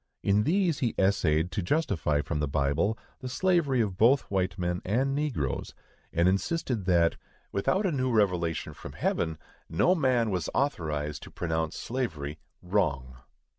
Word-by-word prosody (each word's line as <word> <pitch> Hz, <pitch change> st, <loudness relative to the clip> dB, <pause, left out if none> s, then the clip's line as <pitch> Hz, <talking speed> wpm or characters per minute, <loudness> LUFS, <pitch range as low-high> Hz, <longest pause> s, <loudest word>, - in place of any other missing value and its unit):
In 105 Hz, +2 st, +3 dB
these 175 Hz, -3 st, +2 dB
he 120 Hz, -4 st, 0 dB
essayed 90 Hz, -4 st, +2 dB
to 100 Hz, -, -1 dB
justify 90 Hz, -, +1 dB
from 75 Hz, -1 st, -2 dB
the 75 Hz, -, 0 dB
Bible 70 Hz, +10 st, +1 dB, 0.2 s
the 130 Hz, -2 st, -6 dB
slavery 145 Hz, -7 st, +2 dB
both 115 Hz, +8 st, +4 dB
of -, -, -28 dB
white 95 Hz, 0 st, 0 dB
men 90 Hz, -1 st, -1 dB
and 130 Hz, +8 st, +1 dB
negroes, 140 Hz, -, -2 dB, 0.4 s
and 85 Hz, +2 st, +2 dB
insisted 115 Hz, -, 0 dB
that 85 Hz, -3 st, +3 dB, 0.3 s
"without 190 Hz, -, +1 dB
a 190 Hz, -, +2 dB
new 130 Hz, -3 st, 0 dB
revelation 90 Hz, -7 st, +1 dB
from -, -, -10 dB
heaven, 80 Hz, -1 st, -1 dB, 0.3 s
no 85 Hz, -, +3 dB
man 130 Hz, -, +2 dB
was 90 Hz, -4 st, -1 dB
authorized 75 Hz, -, -1 dB
to -, -, -10 dB
pronounce 80 Hz, -2 st, -2 dB
slavery 80 Hz, -, -3 dB, 0.2 s
WRONG." 70 Hz, -10 st, 0 dB
95 Hz, 150 wpm, -28 LUFS, 80-130 Hz, 0.4 s, both